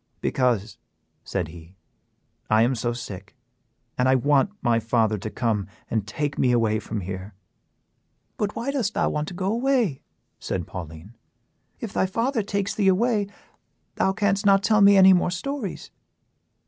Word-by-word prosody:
"Because," 115 Hz, -6 st, 0 dB, 0.4 s
said 90 Hz, -5 st, -3 dB
he, 85 Hz, +2 st, -13 dB, 0.7 s
"I 110 Hz, +1 st, +5 dB
am 125 Hz, +3 st, +2 dB
so 120 Hz, 0 st, -1 dB
sick, 105 Hz, -4 st, -8 dB, 0.6 s
and 125 Hz, +1 st, +3 dB
I 130 Hz, -, +5 dB
want 140 Hz, -, +3 dB
my 115 Hz, -2 st, +3 dB
father 110 Hz, -2 st, +1 dB
to 110 Hz, -, -5 dB
come 105 Hz, -2 st, -1 dB, 0.2 s
and 110 Hz, -3 st, -1 dB
take 145 Hz, +6 st, -3 dB
me 125 Hz, -, +3 dB
away 110 Hz, -3 st, +2 dB
from 105 Hz, -1 st, -5 dB
here." 95 Hz, +2 st, -7 dB, 1.0 s
"But 210 Hz, -1 st, -2 dB
why 240 Hz, +4 st, -2 dB
dost 235 Hz, -7 st, -1 dB
thou -, -, +1 dB
want 150 Hz, 0 st, -2 dB
to 180 Hz, -, -7 dB
go 190 Hz, +3 st, -1 dB
away?" 240 Hz, -, +1 dB, 0.4 s
said 90 Hz, -3 st, -3 dB
Pauline. 80 Hz, +3 st, -9 dB, 0.7 s
"If 225 Hz, -, -6 dB
thy 190 Hz, -, +1 dB
father 230 Hz, +5 st, 0 dB
takes 200 Hz, -1 st, -2 dB
thee 200 Hz, -2 st, +1 dB
away, 205 Hz, +2 st, +2 dB, 0.7 s
thou 190 Hz, -, +1 dB
canst 200 Hz, 0 st, 0 dB
not 195 Hz, -1 st, +4 dB
tell 215 Hz, -1 st, +3 dB
me 200 Hz, 0 st, +7 dB
any 190 Hz, 0 st, +8 dB
more 180 Hz, -1 st, +2 dB
stories." 215 Hz, +3 st, -5 dB
135 Hz, 160 wpm, -24 LUFS, -, 1.0 s, any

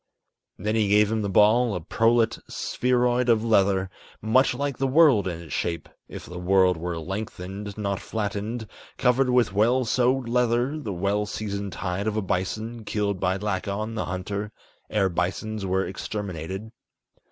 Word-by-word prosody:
Then 105 Hz, +1 st, -2 dB
he 110 Hz, -2 st, +2 dB
gave 105 Hz, +1 st, +4 dB
him 110 Hz, -1 st, 0 dB
the 100 Hz, -, -2 dB
ball, 110 Hz, +3 st, +4 dB
a -, -, -2 dB
prolate 115 Hz, +6 st, +2 dB
spheroid 125 Hz, 0 st, +1 dB
of 115 Hz, -2 st, +4 dB
leather, 95 Hz, -4 st, +2 dB, 0.3 s
Much 125 Hz, +4 st, +3 dB
like 140 Hz, 0 st, -3 dB
the 135 Hz, -, +1 dB
world 135 Hz, -, +5 dB
in 85 Hz, -2 st, -3 dB
its 85 Hz, -2 st, -9 dB
shape, 85 Hz, -2 st, -2 dB, 0.2 s
if -, -, -9 dB
the 90 Hz, +1 st, -8 dB
world 90 Hz, 0 st, +4 dB
were 85 Hz, +1 st, -4 dB
lengthened, 95 Hz, +2 st, -6 dB
not 100 Hz, -2 st, -2 dB
flattened, 110 Hz, +2 st, -3 dB, 0.3 s
Covered 125 Hz, +1 st, +3 dB
with 125 Hz, -5 st, +3 dB
well 120 Hz, +5 st, +3 dB
sewed 125 Hz, +2 st, +1 dB
leather, 125 Hz, +4 st, +1 dB
the 115 Hz, -9 st, -5 dB
well 100 Hz, +3 st, 0 dB
seasoned 100 Hz, -2 st, -4 dB
hide 95 Hz, +2 st, -2 dB
of 110 Hz, 0 st, -1 dB
a -, -, +1 dB
bison, 110 Hz, +5 st, -3 dB
Killed 100 Hz, -2 st, -1 dB
by 95 Hz, +1 st, +1 dB
Lakon, 105 Hz, +2 st, -2 dB
the 110 Hz, -, -2 dB
hunter, 100 Hz, +3 st, -4 dB, 0.4 s
ere 105 Hz, -3 st, +2 dB
bisons 95 Hz, +4 st, -2 dB
were 95 Hz, +1 st, +1 dB
exterminated. 95 Hz, +1 st, -5 dB
105 Hz, 160 wpm, -25 LUFS, 95-115 Hz, 0.4 s, world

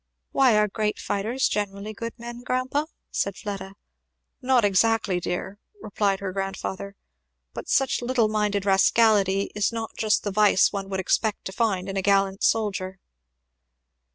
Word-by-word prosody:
"Why, 255 Hz, -5 st, +4 dB
are 210 Hz, 0 st, +3 dB
great 210 Hz, +1 st, -2 dB
fighters 225 Hz, +6 st, -1 dB
generally 205 Hz, +1 st, -3 dB
good 230 Hz, +3 st, -6 dB
men, 240 Hz, 0 st, -8 dB
grandpa?" 255 Hz, +4 st, -1 dB, 0.2 s
said 200 Hz, -2 st, -2 dB
Fleda. 195 Hz, -2 st, -6 dB, 0.7 s
"Not 255 Hz, -3 st, +3 dB
exactly, 205 Hz, -1 st, +2 dB
dear!" 180 Hz, +3 st, -4 dB, 0.2 s
replied 200 Hz, -, -1 dB
her 190 Hz, -2 st, -4 dB
grandfather; 195 Hz, 0 st, -4 dB, 0.6 s
"but -, -, -7 dB
such 270 Hz, -2 st, +2 dB
little 240 Hz, -2 st, +1 dB
minded 210 Hz, -2 st, 0 dB
rascality 195 Hz, 0 st, +3 dB
is 210 Hz, +1 st, 0 dB
not 225 Hz, -1 st, -4 dB
just 215 Hz, -1 st, +1 dB
the 205 Hz, -, -2 dB
vice 205 Hz, -1 st, +4 dB
one 195 Hz, -1 st, -4 dB
would 190 Hz, -1 st, -2 dB
expect 210 Hz, +3 st, 0 dB
to -, -, -4 dB
find 195 Hz, -3 st, -1 dB
in 195 Hz, 0 st, -4 dB
a -, -, +1 dB
gallant 195 Hz, 0 st, +2 dB
soldier." 195 Hz, -4 st, 0 dB
205 Hz, 150 wpm, -25 LUFS, 195-225 Hz, 0.7 s, Why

